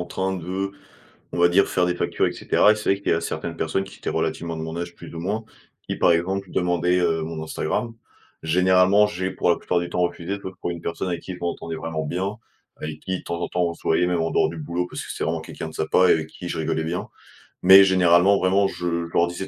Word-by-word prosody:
en 90 - -2
train 95 +2 -2
de, 95 +3 -3 0.6
on - - -3
va 85 0 +5
dire 100 +3 +4
faire 90 - +1
des 90 - +1
factures, - - 0
et - - 0
cetera. 105 - +3
Et - - +2
c'est 110 - -3
vrai 100 - -6
qu'il - - 0
y - - +5
a - - 0
certaines 85 0 -4
personnes 80 +4 -1
qui 95 - -12
étaient - - -4
relativement 85 0 -2
de 80 - -5
mon 80 +1 -5
âge 85 0 -5
plus - - -11
ou 80 - -6
moins, 105 +6 -2 0.4
qui - - -4
par 85 - +4
exemple 95 +3 -1
demandaient, 90 0 +1
heu, 80 -2 +1
mon 80 0 -5
Instagram. 115 +9 -2 0.5
Généralement, 90 +4 +4
j'ai 95 -2 -3
pour 90 - 0
la - - +4
plupart 90 - 0
du 85 - -4
temps 90 - -2
refusé, 90 +3 -2
sauf 95 -1 -7
pour - - -2
une 85 -1 -5
personne 85 +2 -3
avec 85 -1 -3
qui 95 - -7
je 90 - -10
m'entendais 85 -1 -3
vraiment 80 -1 -4
bien, 95 +7 -3 0.4
avec 75 0 -6
qui 95 -1 -4
temps 85 0 -4
en - - -1
temps 90 0 0
on 85 - -2
se - - -17
voyait 90 +2 +2
même 85 -2 0
en 80 - -1
dehors - - +3
du 85 - -7
boulot, 85 +3 -3
parce - - -5
que - - -6
c'est - - -3
vraiment - - -1
quelqu'un 80 - -7
de 80 - -10
sympa 90 +4 +3
et - - +7
avec 80 -1 -1
qui 90 - -9
je 85 - -3
rigolais 80 0 -1
bien. 90 +3 -3 0.5
Mais, 95 +2 +9
généralement 95 +1 +5
vraiment 95 +2 +3
je 85 -2 -3
je - - -15
leur 85 - +4
disais 90 +2 -5
90 Hz, 265 wpm, -23 LUFS, 85-95 Hz, 0.6 s, Mais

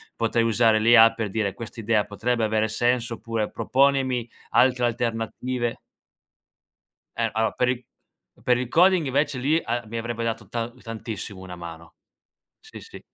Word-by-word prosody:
potrei 115 - +1
usare 115 -1 +3
l'IA 115 0 +7
per 115 -3 -3
dire 100 -1 -1
"quest'idea 115 -2 -1
potrebbe 115 +3 -1
avere 110 0 +1
senso" 120 +2 0
oppure 115 -2 -3
"proponimi 130 0 +1 0.2
altre 125 -1 +3
alternative" 120 +1 -2 1.4
Eh - - +1
allora, 110 +1 0
per 125 0 +1
il 125 -1 -2 0.6
per 125 -1 +3
il 125 0 -2
coding 180 +3 +4
invece 140 +1 0
lì 150 +6 +2
a 120 0 -2
mi 115 +2 -5
avrebbe 115 0 -4
dato 115 -3 -4
ta 115 0 -3
tantissimo 115 -4 -7
una 95 -1 -9
mano 85 -1 -10 0.7
sì, - - -12
sì. - - -12
115 Hz, 145 wpm, -24 LUFS, 110-125 Hz, 1.4 s, l'IA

